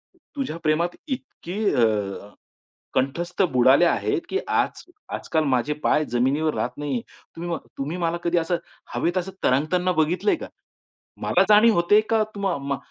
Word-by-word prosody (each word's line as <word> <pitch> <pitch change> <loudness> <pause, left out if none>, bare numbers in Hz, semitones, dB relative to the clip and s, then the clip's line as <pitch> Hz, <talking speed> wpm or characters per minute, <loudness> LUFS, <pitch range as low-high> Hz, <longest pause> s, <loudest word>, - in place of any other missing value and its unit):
तु - - -30 0.2
तुझ्या 270 - -3
प्रेमात 155 +2 +2 0.2
इतकी 260 - -6 0.2
अ, 120 - +4 1.1
कंठस्थ 170 +9 -1
बुडाले 130 +6 +5
आहे 170 - +1
की 390 - 0
आज - - 0 0.3
आजकाल 160 -1 -1
माझे 130 +2 +1
पाय 155 - +3
जमिनीवर 140 +6 +1
राहत - - -3
नाही 145 -1 -4
आहेत. 120 - -2 0.3
तुम्ही 170 +1 -5
म 165 - 0 0.2
तुम्ही 150 +6 -3
मला 165 +1 0
कधी 175 0 +1
असं 170 +1 +1 0.4
हवेत 175 +2 0
असं 185 +1 -2
तरंगताना 165 +8 +2
बघितलंय 180 - +1
का? - - -8 0.7
मला - - +3
जाणीव 215 +2 +7
होते 175 +5 +5
का 225 -1 +3
तुम्हा 195 -4 -1
मा 140 0 -3
170 Hz, 160 wpm, -24 LUFS, 145-185 Hz, 1.1 s, जाणीव